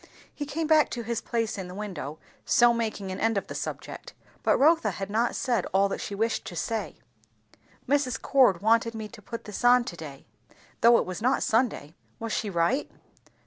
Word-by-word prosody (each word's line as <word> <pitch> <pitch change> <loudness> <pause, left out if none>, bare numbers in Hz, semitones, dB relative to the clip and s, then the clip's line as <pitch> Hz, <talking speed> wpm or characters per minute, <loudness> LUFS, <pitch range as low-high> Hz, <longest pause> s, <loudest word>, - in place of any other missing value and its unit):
He 290 - -5
came 320 +3 -2
back 310 -1 +4
to 235 - -4
his 235 0 -2
place 230 -3 -2
in 185 - -5
the 180 - -9
window, 175 -8 -6 0.3
so 240 0 +5
making 215 -4 -3
an 185 - -5
end 225 -1 +1
of 195 - -1
the - - -8
subject; - - -6 0.3
but - - +3
Rotha 320 +4 +4
had 195 0 -5
not 230 +3 +1
said 245 -3 0
all 195 +1 +4
that - - -4
she 200 - -5
wished 225 +3 0
to 175 - -7
say. 220 +6 -3 0.9
"Mrs. 275 -3 +1
Cord 245 -10 +3
wanted 230 +1 +3
me 220 -1 -5
to 220 -1 -13
put 230 +3 -7
this 210 +3 -6
on 245 0 +6
to 175 - -7
day, 145 -4 -10 0.6
though 235 0 +7
it - - 0
was 185 +3 -6
not 255 +4 +2
Sunday; 225 - 0 0.2
was 225 -1 -4
she 215 - -1
right?" 190 +10 0
225 Hz, 200 wpm, -27 LUFS, 195-245 Hz, 0.9 s, though